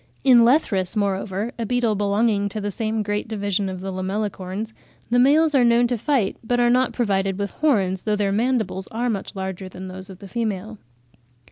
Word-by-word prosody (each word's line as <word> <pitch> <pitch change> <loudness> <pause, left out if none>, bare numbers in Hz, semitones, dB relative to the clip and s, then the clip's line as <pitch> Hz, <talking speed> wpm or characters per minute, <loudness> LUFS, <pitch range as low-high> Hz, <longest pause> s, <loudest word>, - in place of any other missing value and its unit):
In 255 -3 +7
Lethrus, 230 - +2
moreover, 200 +1 -1
a 230 - -1
beetle 245 -2 +1
belonging 205 0 +1
to 215 - -5
the 205 0 -3
same 220 +1 -2
great 205 +1 -2
division 200 -2 -1
of 185 -1 -6
the 195 0 -4
Lamellicorns, 195 +2 -3 0.4
the 245 - +4
males 300 +4 +4
are 265 -3 +5
known 235 0 +4
to 245 +1 0
fight, 240 -3 0
but 245 +2 0
are 240 0 +4
not 255 +1 +3
provided 195 -4 0
with 200 -1 -3
horns, 195 -11 +1
though 210 -1 0
their 205 -1 0
mandibles 220 -3 0
are 240 +2 -1
much 200 -2 -5
larger 190 0 -5
than 185 +1 -8
those 185 +1 -8
of 190 - -10
the 200 - -11
female. 215 -1 -3
210 Hz, 195 wpm, -22 LUFS, 195-235 Hz, 0.4 s, In